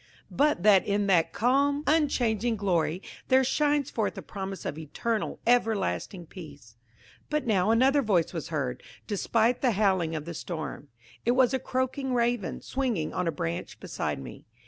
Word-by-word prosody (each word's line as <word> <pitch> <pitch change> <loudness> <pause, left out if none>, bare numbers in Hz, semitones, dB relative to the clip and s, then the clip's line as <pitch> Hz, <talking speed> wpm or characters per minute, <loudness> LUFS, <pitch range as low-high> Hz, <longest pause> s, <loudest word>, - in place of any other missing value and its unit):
–but 295 -10 +2
that 200 -3 +6
in 205 0 0
that 180 -4 +3
calm 280 +4 +2
unchanging 245 -7 +1
glory 180 -3 0 0.2
there 260 0 +5
shines 290 +1 +1
forth 220 -3 -2
a - - -6
promise 195 -1 -6
of 150 - -4
eternal, 215 +8 -3
everlasting 220 -6 +1
peace. 145 - -12 0.5
But 300 -2 -1
now 205 -3 +2
another 265 +5 +4
voice 190 -9 +1
was 165 -4 -4
heard, 135 -6 -3 0.2
despite 225 +3 +1
the 250 -4 +3
howling 190 -5 +1
of 155 -1 -4
the 170 - -6
storm. 155 -3 -6 0.4
It 240 - +2
was 255 0 +3
a 265 - +1
croaking 260 +1 -2
Raven, 235 -6 0
swinging 240 - -2
on 180 - -1
a - - +2
branch 85 - -4
beside - - -3
me. 70 - -10
215 Hz, 160 wpm, -28 LUFS, 170-255 Hz, 0.5 s, that